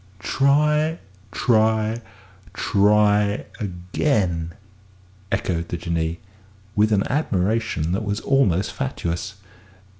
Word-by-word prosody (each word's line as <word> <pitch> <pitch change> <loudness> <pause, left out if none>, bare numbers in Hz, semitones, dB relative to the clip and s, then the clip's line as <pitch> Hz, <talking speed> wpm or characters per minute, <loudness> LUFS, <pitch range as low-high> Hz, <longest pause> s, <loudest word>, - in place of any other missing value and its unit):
"'Try, 150 - +2 0.3
try, 110 0 +2 0.5
try 105 0 +3
again,'" 90 - -1 0.8
echoed 85 -2 -1
the 85 - -4
Jinnee, 85 0 -2 0.6
with 105 +1 +3
an 100 -2 +2
admiration 105 - 0
that 95 +4 -1
was 105 0 -2
almost 105 -10 +2
fatuous. 100 -7 -3
105 Hz, 85 wpm, -22 LUFS, 90-115 Hz, 0.8 s, try